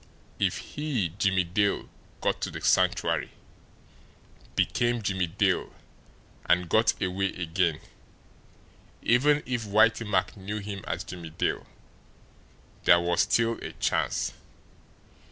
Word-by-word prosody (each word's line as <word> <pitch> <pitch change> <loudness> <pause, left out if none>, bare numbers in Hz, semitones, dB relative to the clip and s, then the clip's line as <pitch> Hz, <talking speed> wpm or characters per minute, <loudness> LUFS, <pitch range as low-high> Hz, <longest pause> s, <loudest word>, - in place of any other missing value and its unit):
If - - +1
he, 140 - -2
Jimmie 95 -2 +3
Dale, 100 +4 0 0.3
got - - 0
to - - -1
the - - -6
Sanctuary, - - +1 1.2
became 120 -1 +1
Jimmie 95 -3 0
Dale 95 +2 0 0.8
and 90 0 +3
got 110 +7 +3
away 95 +1 0
again, 85 -2 0 1.2
even 145 +5 +3
if 120 -2 -2
Whitey 110 +2 +3
Mack 95 -2 +1
knew 100 +1 -5
him 100 -2 -6
as 85 - -2
Jimmie 85 -1 -8
Dale, 80 - -2 1.2
there 85 - +7
was 85 0 +2
still 115 0 +2
a - - -6
chance. - - 0
100 Hz, 115 wpm, -27 LUFS, 90-115 Hz, 1.2 s, there